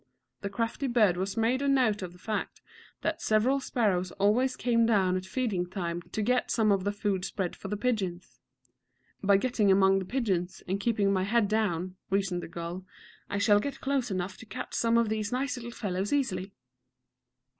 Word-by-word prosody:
The 200 - -3
crafty 230 +6 -2
bird 220 -7 +4
had 190 +4 -3
made 235 +4 +2
a 280 - 0
note 250 -7 +3
of 180 -2 -5
the 180 - -16
fact 215 +3 -4 0.4
that - - -2
several 230 +6 +2
sparrows 195 -9 0
always 220 +6 +2
came 230 -2 +2
down 190 -5 +3
at 185 0 -3
feeding 195 -5 -1
time 175 -3 -3
to 215 +5 -4
get 250 +3 +1
some 220 -2 +3
of 195 -1 +1
the 205 - +1
food 205 -2 -1
spread 190 -2 -3
for - - -8
the 210 +2 -2
pigeons. 195 -7 -2 0.8
"By 200 0 +5
getting 220 -2 +1
among 195 0 +5
the 190 - -5
pigeons, 190 -7 -1
and 190 +2 -1
keeping 200 -2 +1
my 185 -1 +1
head 225 +1 +2
down," 185 -4 -1
reasoned 190 -2 0
the - - -7
gull, 170 +2 -6 0.5
"I 200 - -2
shall 205 0 +5
get 280 +6 -4
close 270 -3 0
enough 185 0 -3
to - - -11
catch - - -6
some 230 0 +2
of 235 -1 +3
these 215 -1 -2
nice 260 +2 -1
little 240 -1 -7
fellows 200 -4 -3
easily." 235 -9 0
205 Hz, 190 wpm, -29 LUFS, 185-235 Hz, 0.8 s, By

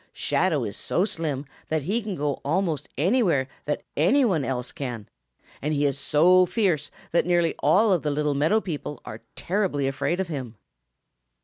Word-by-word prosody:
Shadow - - 0
is - - -4
so 180 - 0
slim 150 -8 -3 0.2
that 155 -2 -1
he 210 - 0
can 210 -3 -4
go 145 -3 -2
almost 155 -1 -1
anywhere 170 - +2 0.2
that 150 - -2
any 215 - +4
one 175 - +1
else 125 -1 -3
can, 120 -7 -6 0.5
and 150 +2 -1
he 145 0 +1
is 140 -1 0
so 180 +6 +4
fierce 180 -6 0 0.2
that 170 - +2
nearly 175 -2 +2
all 210 +2 +4
of 180 -4 +3
the 150 - -1
Little 150 0 0
Meadow 155 +10 +2
people 150 - -5
are 110 +1 -8
terribly 185 -7 -1
afraid 135 +6 -1
of 190 - -1
him. 130 -8 -5
155 Hz, 175 wpm, -25 LUFS, 140-185 Hz, 0.5 s, any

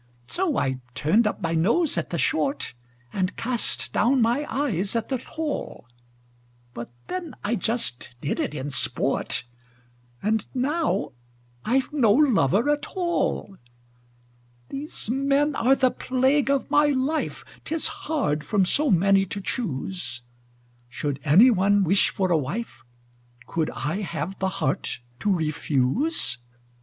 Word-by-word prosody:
So 350 - -1
I 130 -1 0 0.2
turned 210 +9 +3
up 210 - -3
my 165 0 0
nose 230 - +2
at 170 - -2
the 170 - -2
short, 140 -2 0 0.4
And 185 0 -1
cast 240 0 -2
down 255 +5 +3
my 240 +5 +2
eyes 210 - 0
at 230 -1 -1
the 260 -2 -1
tall; 310 - -5 0.9
But 120 0 -6 0.2
then 355 -6 -5
I 210 - 0
just 220 - -1
did 140 - -2
it 150 - -2
in 145 0 -4
sport 135 - 0 0.8
And 215 +1 +1
now 295 - 0 0.5
I've 265 +5 +1
no 235 -8 +4
lover 235 - +3
at 295 -1 -1
all! 345 - -1 1.1
These 285 -3 -5
men 275 +2 +2
are 265 +2 +4
the 260 -2 +3
plague 265 +2 +1
of 275 -1 0
my 295 0 +5
life: 290 +3 -1 0.2
'Tis 325 0 -1 0.2
hard 155 - 0
from 195 +5 +2
so 295 +10 +2
many 195 0 +4
to 200 - -4
choose! 175 - -4 0.7
Should 140 +2 -3
any 185 - +7
one 200 -1 +3
wish 190 +3 +3
for 185 -2 -1
a 165 - +5
wife, 150 - -5 0.6
Could 160 -2 -1
I 155 +5 -3
have 195 -1 -4
the 190 - +1
heart 135 -6 -2 0.2
to 205 - +1
refuse? 155 - 0
210 Hz, 135 wpm, -25 LUFS, 165-275 Hz, 1.1 s, any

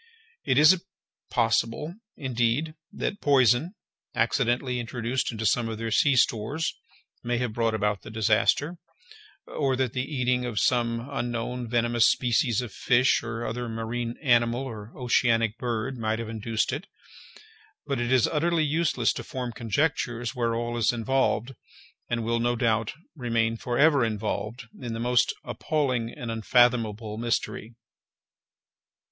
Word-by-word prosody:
It 130 - +1
is 170 +5 +6 0.5
possible, 115 +6 0 0.2
indeed, 130 +3 0 0.2
that 205 - -3
poison, 140 - +3 0.4
accidentally 125 +1 +1
introduced 120 +2 -2
into 110 -1 -4
some 115 +3 +2
of 110 - -4
their 115 0 -4
sea 140 +5 +4
stores, 125 +7 +1 0.5
may 120 0 0
have 120 -2 -2
brought 115 -1 +1
about 105 -1 0
the - - -10
disaster, 110 - +1 0.7
or 135 -3 -1
that 130 -2 -1
the 130 - -1
eating 125 -3 0
of 120 -4 -2
some 115 -1 +1
unknown 120 -2 -3
venomous 120 0 +3
species 120 -1 +1
of 120 - -8
fish, 125 +1 +3
or 115 0 -5
other 120 +1 -3
marine 115 +1 -3
animal, 120 -1 +3
or 110 -4 -8
oceanic 115 -3 +2
bird, 120 +1 -3
might 110 0 0
have 115 -1 -5
induced 110 +1 -1
it—but 430 - -9
it 120 +1 -1
is 130 -3 +5
utterly 165 +1 +1
useless 150 -6 +1
to - - -6
form 125 -2 -5
conjectures 120 0 -1
where 120 -2 0
all 120 0 -2
is 115 - +3
involved, 125 +1 0 0.6
and 120 -1 -1
will, 115 +1 +1
no 120 +1 +1
doubt, 115 -2 0 0.2
remain 115 -4 0
for 120 +1 -3
ever 145 -3 +5
involved, 110 +1 -3 0.2
in 120 -2 -4
the 115 - -4
most 120 +1 +2
appalling 125 -1 -1
and 120 -2 -6
unfathomable 115 -2 +2
mystery. 115 -1 -2
120 Hz, 140 wpm, -26 LUFS, 115-130 Hz, 0.7 s, is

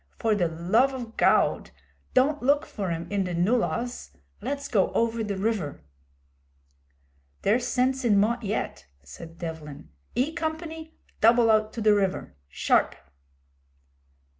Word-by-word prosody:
For 225 -2 +1
the 185 -5 +1
love 190 +12 +1
o' 250 -2 -4
Gawd - - +2 0.5
don't 285 +4 +3
look 285 +4 +2
for 195 -3 -4
'im 165 0 -3
in 200 -1 +1
the 180 -1 -3
nullahs! 235 +6 0 0.3
Let's 280 +5 -3
go 195 -5 +2
over 230 0 0
the 205 -2 -3
river.' 190 - -2 1.6
'There's 235 +5 +2
sense 260 +2 +1
in 215 -4 +3
Mott 235 +4 +1
yet,' 210 - -3 0.2
said 165 - -11
Devlin. 155 - -7 0.3
'E 275 +6 0
Company, 320 0 -5 0.2
double 230 0 +5
out 215 0 +2
to 230 - -5
the 215 -1 +5
river 195 - -1
sharp!' - - +1
220 Hz, 135 wpm, -26 LUFS, 185-255 Hz, 1.6 s, double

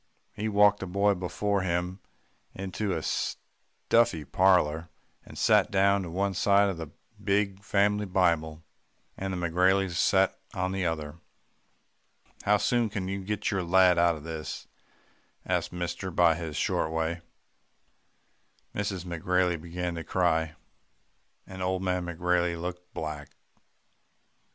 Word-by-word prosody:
He 110 +2 -3
walked 105 0 +4
the 95 - -5
boy 100 +3 +2
before 100 +2 -1
him 90 +1 -2 0.6
into 95 +2 -4
the 95 - -1
stuffy 115 -10 -1
parlour, 85 -3 +2 0.3
and - - -13
sat - - +4
down 100 0 +3
on - - -8
one 100 +2 0
side 100 +2 +3
of 95 - -4
the 80 -1 -6 0.4
big 100 0 0
family 105 0 +1
Bible, 85 -4 +1 0.5
and 95 0 -4
the 95 - -3
McGraileys 90 +2 +2
sat - - +2 0.2
on 95 0 -1
the 95 -2 -1
other. 80 -1 -4 1.2
"'How 105 +1 +3
soon 120 +2 +1
can 100 -2 -4
you 95 0 -4
get 105 +2 -2
your 95 -2 0
lad 90 0 +4
out 85 -1 +4
of 75 - -10
this?' 80 -1 -6 0.8
asked 90 -1 -1
mister 90 +1 -4
in 85 -2 +3
his 80 -4 -5
short - - 0
way. 80 +1 -2 1.5
"Mrs. 100 -3 -3
McGrailey 90 0 0
began 85 +1 -4
to 85 -1 -5
cry, 80 -3 0 0.9
and 95 0 -9
old 95 0 -1
man 90 -1 -1
McGrailey 85 0 0
looked 90 +1 -6
black. 75 -3 -5
90 Hz, 135 wpm, -28 LUFS, 85-100 Hz, 1.5 s, walked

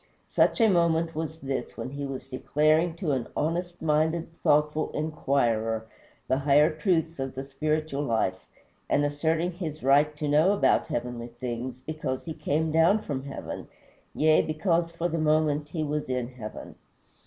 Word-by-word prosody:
Such - - +3
a 225 - +6
moment 170 -3 +2
was 160 0 -5
this, 135 -1 -4
when 130 - -5
he 140 0 -4
was 135 -1 -6
declaring 155 +5 +1
to 170 -4 -2
an 130 -4 -1
honest 175 +3 -2
minded, 160 +2 +1
thoughtful 150 +1 +2
inquirer 120 -8 0 0.4
the 130 +1 +1
higher 145 +3 +4
truths 160 0 0
of 135 0 -4
the 135 - -4
spiritual 150 +1 -2
life, 110 -8 -1 0.4
and 145 - +3
asserting 160 +4 0
his 160 -5 -6
right 145 +3 +4
to 150 - -2
know 155 +7 +4
about 205 - +3
heavenly 120 0 -3
things, 120 +1 -5
because 145 -3 -4
he 160 - -4
came 155 +1 -1
down 170 +7 +4
from 135 -5 -4
heaven 140 - -6 0.5
yea, 155 0 +5
because 165 +2 0
for 170 +1 -2
the 165 -1 -2
moment 155 -1 +2
he 155 +1 -3
was 150 -2 -2
in 125 -1 -1
heaven. 120 -4 -8
150 Hz, 160 wpm, -27 LUFS, 135-160 Hz, 0.5 s, a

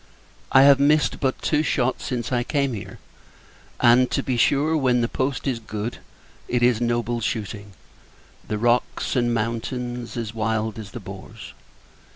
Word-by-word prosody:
I 135 - +7
have 140 -1 +7
missed 150 +2 +3
but 130 -2 0
two 150 -1 +2
shot 130 -4 0
since 120 -1 -3
I 125 -1 +1
came 140 -1 0
here; 100 - -7 0.8
and, 125 +2 +5
to - - -1
be 130 - -1
sure, 145 +6 +2
when 130 -5 +2
the 115 - +1
post 135 +2 -2
is 130 -4 -1
good, 110 +1 -5 0.5
it 120 -1 0
is 120 -2 +3
noble 120 0 0
shooting! 105 -2 -4 0.7
The 105 - -2
rocks, 120 +2 0
and 120 -2 +2
mountains, 120 +1 -3
as 115 -2 -4
wild 110 0 -1
as 105 -3 -8
the 120 - -6
boars. 100 +2 -10
120 Hz, 160 wpm, -23 LUFS, 110-130 Hz, 0.8 s, I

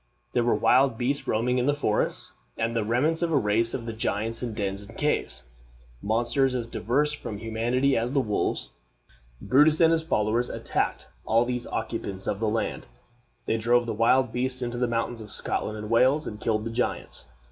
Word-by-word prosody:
There 120 - +2
were 120 - +2
wild 130 -2 +3
beasts 135 +4 -1
roaming 125 +3 +1
in 125 - 0
the 145 - +3
forests, 110 -7 -1 0.3
and 115 +1 -1
the 115 - +1
remains 135 +10 +1
of 170 -1 0
a 150 - +3
race 115 0 +2
of 115 - -5
giants 110 +1 -1
in 120 -3 -4
dens 100 -2 -2
and 100 - -12
caves - - -1 0.6
monsters 120 +5 +1
as 120 -2 -2
diverse 135 +6 0
from 110 -7 -6
humanity 120 +5 0
as 115 +2 0
the 140 - +2
wolves. 105 -6 -1 0.7
Brutus 150 +4 +4
and 165 -1 +6
his 165 -1 +2
followers 115 -5 0
attacked - - -2 0.2
all 115 +2 +3
these 125 -1 -3
occupants 110 -4 -3
of 100 - -2
the 110 -1 +1
land. 110 +1 -2 0.6
They 115 - 0
drove 120 +2 +2
the 115 - -2
wild 120 +3 +3
beasts 130 +1 -1
into 120 0 -3
the 125 - +1
mountains 115 0 -2
of 105 -2 -9
Scotland 110 0 0
and 105 0 -6
Wales, 130 +6 +4
and 105 0 -7
killed 110 -1 0
the 115 - -3
giants. 120 +2 -3
120 Hz, 190 wpm, -26 LUFS, 110-130 Hz, 0.7 s, and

